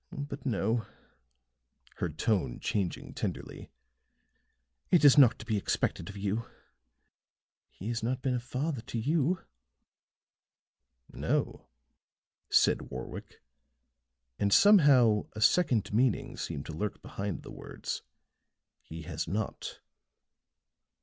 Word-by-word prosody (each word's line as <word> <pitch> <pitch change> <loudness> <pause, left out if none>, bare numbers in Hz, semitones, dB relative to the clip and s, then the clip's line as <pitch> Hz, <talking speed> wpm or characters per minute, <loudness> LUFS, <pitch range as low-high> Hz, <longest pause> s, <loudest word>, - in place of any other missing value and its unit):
But 145 -1 -6
no," 110 0 0 1.1
her 90 - -1
tone 90 - -1
changing 95 -4 -2
tenderly, - - -5 1.2
"it 170 -5 +5
is 140 - +9
not 130 -5 +7
to - - -10
be 110 -2 0
expected 95 - -1
of 100 - -8
you. 105 +3 -2 1.2
He 100 - -7
has 120 -1 -2
not 125 +3 -2
been 130 - +1
a 125 - 0
father 130 +3 -3
to 120 0 -6
you." 155 +8 +1 1.7
"No," - - -1 0.8
said - - +3
Warwick, - - -8 1.0
and 100 - +1
somehow 135 - +6
a 110 - -7
second 120 - +3
meaning 130 +2 +1
seemed 80 - -5
to 80 - -7
lurk 100 +7 -4
behind 100 0 -4
the - - -10
words, - - -6 0.8
"he 80 0 -9
has 80 -1 -4
not." 105 +3 -4
115 Hz, 110 wpm, -30 LUFS, 100-135 Hz, 1.7 s, is